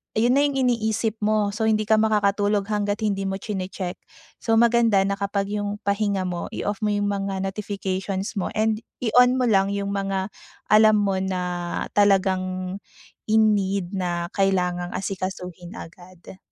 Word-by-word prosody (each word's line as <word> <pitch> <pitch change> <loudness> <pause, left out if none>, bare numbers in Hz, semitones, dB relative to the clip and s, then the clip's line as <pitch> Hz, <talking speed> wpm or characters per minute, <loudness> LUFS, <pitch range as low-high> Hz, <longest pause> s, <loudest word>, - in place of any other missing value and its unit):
iyon 230 +3 +3
na 285 - +4
yung 285 -1 0
iniisip 220 -2 0
mo, 215 0 +2
so 220 - -2
hindi 215 -1 +2
ka 220 - +5
makakatulog 205 -1 +2
hangga't 205 -1 -1
hindi 200 -2 0
mo 195 - -2
chine-check. 190 -3 -4 0.4
So, 225 - +1
maganda 230 -3 +4
na 200 0 0
kapag 200 0 -1
yung 205 -1 -2
pahinga 200 -1 0
mo 175 -1 -4
i-off 205 0 -3
mo 210 - +2
yung 205 0 0
mga 195 -1 -2
notifications 195 0 -3
mo 180 - -1
and 215 0 +1 0.2
i-on 250 +2 +5
mo - - +2
lang 195 -2 +3
yung 200 0 -2
mga 195 -1 -1 0.4
alam 215 0 +7
mo 195 -1 0
na 190 -1 -2 0.6
talagang 185 -2 +2 0.6
in 220 -1 +5
need 190 -2 -2
na 175 -2 -2
kailangang 180 -2 0
asikasuhin 185 -1 -5
agad. 180 0 -12
200 Hz, 155 wpm, -24 LUFS, 190-215 Hz, 0.6 s, alam